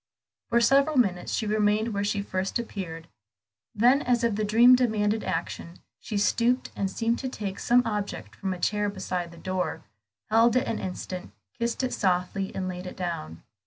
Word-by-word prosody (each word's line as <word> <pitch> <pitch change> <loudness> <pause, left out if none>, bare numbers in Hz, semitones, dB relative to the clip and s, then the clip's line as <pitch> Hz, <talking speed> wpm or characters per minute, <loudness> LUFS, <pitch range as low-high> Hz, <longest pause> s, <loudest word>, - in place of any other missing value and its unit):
For 235 - +4
several 275 +5 +4
minutes 190 -8 +1
she 220 - -1
remained 210 +1 +2
where 200 0 -1
she 205 0 -1
first 190 -1 -2
appeared. 180 -8 -6 0.7
Then, 245 +6 +5
as 245 -2 +1
if 230 -2 +2
the 215 +1 -1
dream 235 +4 +7
demanded 220 -3 +1
action, 170 0 -4 0.2
she 215 - -4
stooped, 240 +5 +1
and 195 - -1
seemed 230 +4 -1
to 260 - -3
take 200 -5 -5
some 245 +1 +4
object 200 - -4
from 190 - -3
a 185 - -4
chair 210 +2 0
beside 185 -3 -3
the 170 - -14
door, 185 +1 -3 0.5
held 230 +2 +5
it 255 - +3
an 225 - -2
instant, 185 0 -6 0.2
kissed 235 +2 -2
it 255 - -1
softly 185 +1 0
and 185 -1 -2
laid 180 0 -5
it - - -8
down. 85 - -5
205 Hz, 180 wpm, -27 LUFS, 185-235 Hz, 0.7 s, dream